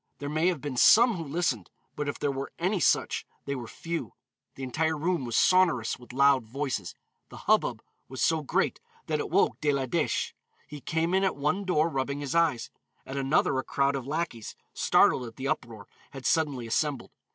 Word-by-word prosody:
There 145 - -5
may 155 +3 +1
have 175 -6 0
been 145 -4 -5
some 235 - +7
who 170 - -4
listened, 140 - -1 0.3
but 145 -1 -2
if - - -4
there 145 - 0
were 135 0 -5
any 185 +3 0
such, - - +2 0.2
they 140 - -2
were 125 -4 -5
few; 165 +8 -5 0.4
the 135 - -7
entire 160 +5 0
room 170 -2 -1
was 120 -1 -3
sonorous 170 -12 +3
with 125 - -13
loud 135 0 +4
voices; 130 -6 -3 0.3
the - - -11
hubbub - - +2 0.3
was 130 0 -8
so 160 -1 +2
great 145 - 0 0.3
that - - -1
it - - -3
woke - - +2
De 150 - +2
la 140 -2 0
Dèche; 160 +5 -1 0.3
he 150 -1 -10
came 165 +4 -1
in 190 +1 +3
at 195 - +1
one 155 +8 -1
door 165 -4 +2
rubbing 140 -2 -2
his 145 0 -4
eyes; 165 -8 +1 0.3
at 135 - -7
another 135 0 +2
a - - -2
crowd 140 +2 +1
of 135 -2 -5
lackeys, 145 -7 -3 0.2
startled 125 - +3
at 115 - -11
the 130 - -4
uproar, 115 -6 -3 0.2
had 135 -2 -10
suddenly 145 -7 +1
assembled. 135 +3 -1
140 Hz, 195 wpm, -28 LUFS, 130-160 Hz, 0.4 s, some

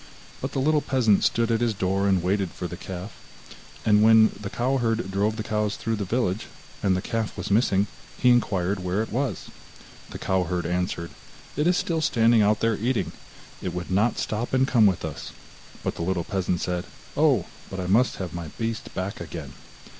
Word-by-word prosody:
But - - -4
the - - 0
little 150 +2 +3
peasant 120 -8 +3
stood 115 0 +2
at 115 0 +1
his 115 -3 +1
door, 95 +1 +1
and 95 -3 +2
waited 95 0 +1
for 90 - -7
his 85 - -5
little 85 - -8
calf, 95 +2 -6 0.7
and 105 -1 +5
when 110 0 +7
the 100 -1 -5
cow 130 +5 0
herd 115 -4 0
drove 105 +3 +1
the 110 - -4
cows 105 -1 -1
through 115 -1 -2
the 100 - -2
village, 105 -1 -1 0.3
and 95 -2 +2
the 95 - -4
calf 115 -2 -2
was 90 - -4
missing, 100 -2 +3 0.3
he 125 - +5
inquired 100 -5 +1
where 90 +4 0
it - - -8
was. 125 - -2 0.6
The - - -7
cow 95 -1 0
herd 90 -1 -2
answered: 90 -1 -2 0.4
'It 150 +3 +1
is 180 0 +3
still 165 -2 0
standing 115 -6 +4
out 105 +1 +3
there 115 0 +3
eating. 110 -7 0 0.5
It 90 -2 -4
would 90 +1 -5
not 105 +5 +2
stop 115 +4 -2
and 130 +1 +3
come 115 -6 +5
with 95 -4 0
us.' 75 -2 -6 0.5
But - - -1
the - - -4
little 90 0 0
peasant 90 -2 -1
said: 90 0 -2 0.3
'Oh, - - +3 0.2
but 95 - -5
I 90 - -2
must 110 +8 +3
have 90 -4 -5
my 85 -2 -5
beast 115 -1 -4
back 95 +1 -4
again. 80 -4 -7
105 Hz, 205 wpm, -25 LUFS, 90-115 Hz, 0.7 s, when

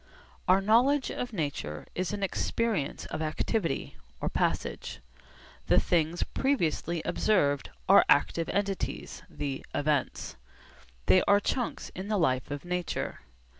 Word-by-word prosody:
Our 185 +2 +5
knowledge 245 +7 +3
of 245 - -4
nature 145 - -3
is 185 0 -2
an 205 -1 -3
experience 195 -5 -1
of - - -2
activity 160 +2 -1 0.2
(or - - -1
passage). 65 - -2 0.7
The - - +5
things 170 0 +1
previously 170 - 0
observed 145 -10 +2 0.2
are - - +8
active 165 -1 +3
entities, 200 -1 -2
the 140 -2 -4
'events.' 145 -2 -1 0.7
They 95 - +6
are 200 - +6
chunks 245 +4 -2
in 185 +2 -6
the 215 -1 +1
life 130 -8 +1
of 145 +1 -5
nature. 180 -1 -3
175 Hz, 125 wpm, -29 LUFS, 145-210 Hz, 0.7 s, are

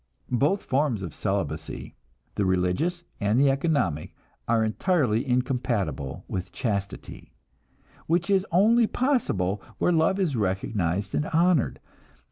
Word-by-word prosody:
Both 145 - +2
forms 130 -7 0
of 85 - -6
celibacy, - - -3 0.4
the 105 - 0
religious 95 - 0 0.2
and 105 +3 +2
the 140 0 +5
economic, 135 - -1 0.3
are 115 -1 +3
entirely 120 - +1
incompatible 120 - -1
with 90 -1 -4
chastity, 100 -4 -4 0.7
which 170 +1 +1
is 195 -2 +3
only 220 +6 +4
possible 105 - 0 0.2
where - - +2
love 165 +4 +2
is 170 -8 +1
recognized 95 -2 -1
and 150 - 0
honored. 165 -2 +2
125 Hz, 115 wpm, -26 LUFS, -, 0.7 s, the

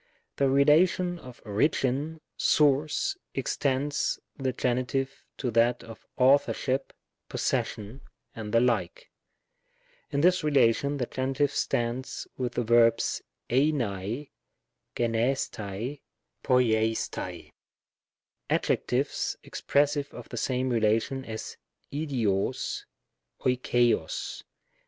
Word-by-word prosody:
The 140 -1 +3
relation 170 +6 +4
of 125 -4 -13
origin, 140 +7 0
source, 150 - +2 0.2
extends 140 +1 0 0.2
the 130 -1 -1
Gen 125 0 0
itive 135 +2 -1 0.3
to 125 -3 -2
that 115 +2 +3
of 115 -2 -12
authorship, 135 0 +2 0.4
possession, 110 +6 -2 0.3
and 110 -2 -6
the 115 +1 +4
like. 125 - 0 1.0
In 140 -1 0
this 180 +1 +4
relation, 140 -1 +3
the 125 - -1
Gen. 130 +2 -3
stands 130 -2 -2
with 125 -2 -3
the 120 - 0
verbs, 115 0 +3 0.3
kivaty 125 -2 0 0.6
ybvbO&uL^ 115 -1 +1 1.3
noulo&ac; 115 -3 +2
with - - -7 1.0
adjectives - - 0
expressive 145 0 0
of 120 - -9
the 120 - -6
same 130 +2 0
relation 115 +4 +1
as 110 -1 -6 0.4
v8iogy 125 -10 -1 0.6
olxttog. 120 -8 +1
130 Hz, 95 wpm, -28 LUFS, 115-140 Hz, 1.3 s, relation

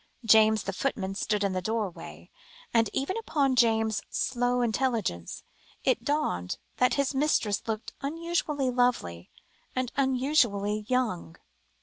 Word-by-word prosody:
James, 220 -1 +5
the 195 - -3
footman, 195 -3 -2
stood 205 +1 -1
in 195 -1 0
the 185 - -1
doorway, 180 - -4 0.4
and 225 -2 +3
even 275 +8 -2
upon 280 -11 +1
James's 225 -3 +2
slow 245 -1 0
intelligence, 225 - -1 0.4
it - - +1
dawned 90 - -1 0.2
that 250 - +3
his 280 0 0
mistress 265 -8 +1
looked 220 0 -4
unusually 300 -3 -1
lovely, 240 - 0 0.5
and 255 -1 -1
unusually 250 -7 +1
young. 235 - -1
230 Hz, 120 wpm, -28 LUFS, 205-265 Hz, 0.5 s, James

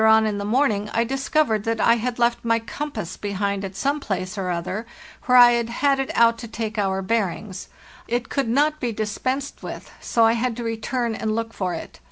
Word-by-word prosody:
Later 220 - +5
on 220 0 +5
in 210 -1 -1
the 200 - -3
morning 210 -3 +1
I 230 - +3
discovered 265 -3 +1
that 225 -1 0
I 230 +2 +4
had 240 +1 -2
left 235 0 +1
my 230 -1 +3
compass 225 - -5
behind 200 -1 -2
at 190 -1 -6
some 280 +7 0
place 190 -5 -3
or 190 -3 -3
other 185 +6 -3 0.4
where 250 0 +6
I 245 -1 +9
had 235 -1 0
had 275 +3 +2
it 270 - -1
out 230 0 +4
to 235 - -7
take 220 -1 -4
our 195 -1 0
bearings. 195 -2 -2 0.4
It 240 0 -1
could 275 -5 -1
not 300 +5 +2
be 245 -4 -1
dispensed 255 +6 -3
with, - - -8
so 230 -1 +3
I 225 - +5
had 235 0 -1
to 240 - -4
return 230 +1 -2
and 220 0 -2
look 230 0 -3
for 185 -2 -2
it. - - -9
230 Hz, 220 wpm, -23 LUFS, 205-245 Hz, 0.4 s, I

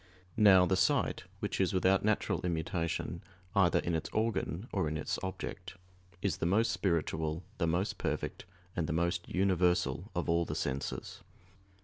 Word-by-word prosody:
Now, 95 -4 +7
the 95 - +2
sight, 95 +1 +1 0.2
which - - -1
is 95 0 +1
without 95 +1 +3
natural 105 0 +1
immutation 85 0 -2 0.3
either 95 -5 +4
in 85 - 0
its 80 - -2
organ 110 -2 -1
or 95 -5 0
in 80 - -2
its 80 - -2
object, 95 -1 -5 0.5
is 100 - 0
the 85 - 0
most 110 +6 +3
spiritual, 80 -2 -1 0.2
the 85 - +2
most 90 +5 0
perfect, - - -3 0.3
and 85 -3 -1
the - - -1
most 85 +1 0
universal 90 0 +1
of 90 - -1
all 85 0 +3
the - - -4
senses. 65 +1 -3
90 Hz, 155 wpm, -32 LUFS, 85-95 Hz, 0.5 s, Now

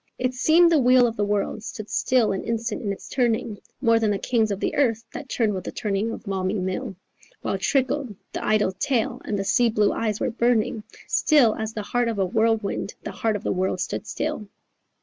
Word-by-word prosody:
It 255 0 -1
seemed 330 +6 +5
the 320 - +5
wheel 250 -1 +5
of 230 -1 -1
the 205 - 0
world 205 0 -1
stood 215 -1 -7
still 250 -4 +2
an 195 - -3
instant 230 0 -2
in 205 - -2
its 200 - -7
turning, 230 -4 0 0.2
More 230 -3 +4
than 220 -1 +1
the 205 - +1
kings 225 0 +1
of 200 -1 -2
the - - -1
earth 230 -5 +1
that - - -7
turned 220 -4 +1
with 185 -2 -4
the - - -5
turning 205 +1 -1
of - - -6
Valmy 195 -1 -2
mill: 190 +4 -3 0.5
While 195 - -1
trickled 265 0 0 0.2
the - - -4
idle 215 -2 +2
tale 230 +5 -1
and 210 - -2
the 195 - -1
sea 230 +4 +3
blue 210 -2 +2
eyes 215 -2 -1
were - - -1
burning, 235 -2 +1 0.3
Still 275 -8 +4
as 220 0 -4
the 215 - -4
heart 240 +4 0
of 230 -2 -2
a 195 - +2
whirlwind 220 0 0
the - - -5
heart 220 -1 -1
of 205 - -5
the - - -1
world 185 0 -1
stood 185 - -3
still. 210 - -3
220 Hz, 220 wpm, -24 LUFS, 205-240 Hz, 0.5 s, seemed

